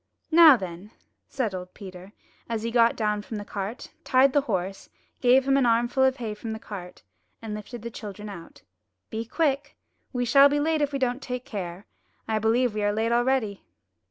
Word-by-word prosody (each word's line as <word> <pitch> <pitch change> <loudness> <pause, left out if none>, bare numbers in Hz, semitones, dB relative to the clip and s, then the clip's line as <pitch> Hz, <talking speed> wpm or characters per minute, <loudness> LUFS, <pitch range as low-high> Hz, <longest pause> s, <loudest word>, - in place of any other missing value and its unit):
Now 320 -4 +9
then," 185 0 -8 0.4
said 230 -7 -2
old 180 0 -7
Peter, 185 -1 -10 0.4
as 225 -1 -2
he 230 - -2
got 230 0 +4
down 210 -2 -1
from 215 +1 -7
the 205 - -6
cart, 205 +5 -6
tied 260 +1 +4
the 285 - +4
horse, 190 -1 -3 0.3
gave 255 +2 +4
him 275 0 +4
an 270 - +3
armful 240 +3 +2
of 265 0 +3
hay 225 -3 -4
from 220 +1 -6
the - - -5
cart, 185 -5 -9 0.4
and 220 -2 -6
lifted 210 +2 -8
the 235 - -5
children 210 -1 -8
out. 180 -5 -11 0.5
''Be 225 +1 -4
quick. 285 -3 -1 0.3
We 245 -2 -1
shall 275 +3 +7
be 290 +1 +1
late 315 +1 +1
if 290 -1 +1
we 280 - -1
don't 255 0 -1
take 250 -1 -5
care. 185 -1 -6 0.4
I 220 -1 0
believe 230 +2 +2
we 210 - -2
are 205 0 +2
late 220 +2 0
already.' 240 -4 +1
230 Hz, 195 wpm, -26 LUFS, 205-260 Hz, 0.5 s, Now